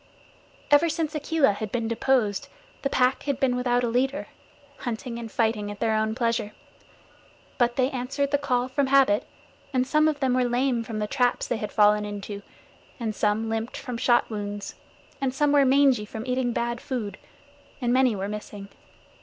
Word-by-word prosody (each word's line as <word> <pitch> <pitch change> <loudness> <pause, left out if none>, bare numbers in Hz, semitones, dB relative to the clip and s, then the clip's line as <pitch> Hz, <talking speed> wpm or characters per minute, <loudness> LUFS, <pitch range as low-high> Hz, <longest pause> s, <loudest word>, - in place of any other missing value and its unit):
Ever 290 +4 +6
since 320 -1 -2
Akela 305 -4 +2
had 210 0 -5
been 230 -2 -1
deposed, 230 -3 +1 0.3
the 275 - 0
Pack 255 0 +2
had 280 -3 -1
been 255 -2 +2
without 245 0 +1
a - - +1
leader, 265 +5 0 0.5
hunting 235 0 -5
and 230 -2 -7
fighting 220 -3 0
at 205 -1 -7
their 225 -1 +1
own 220 0 0
pleasure. 230 -3 -1 1.1
But 240 -1 +2
they 260 +1 +1
answered 275 +2 -2
the 285 - +2
call 250 -3 0
from 270 +1 0
habit; 265 -6 +4 0.4
and 255 -2 +1
some 305 +3 +3
of 305 -2 0
them 265 -2 +1
were 255 0 +3
lame 245 0 +1
from 225 -1 -5
the 210 - -1
traps 245 +3 0
they 240 - -1
had 210 -1 -5
fallen 210 0 +4
into, 205 0 -6 0.6
and 225 -2 -2
some 210 +1 0
limped 225 +2 -3
from 250 -3 -6
shot 240 0 +3
wounds, 205 -1 -5 0.5
and 265 -1 -1
some 295 +1 +2
were 285 -1 +5
mangy 265 -4 +4
from 220 +2 -7
eating 250 -1 0
bad 235 0 -2
food, 240 -7 -4 0.6
and 245 -2 +1
many 255 -3 +4
were 195 0 -3
missing. 205 -1 -7
245 Hz, 180 wpm, -26 LUFS, 220-265 Hz, 1.1 s, Ever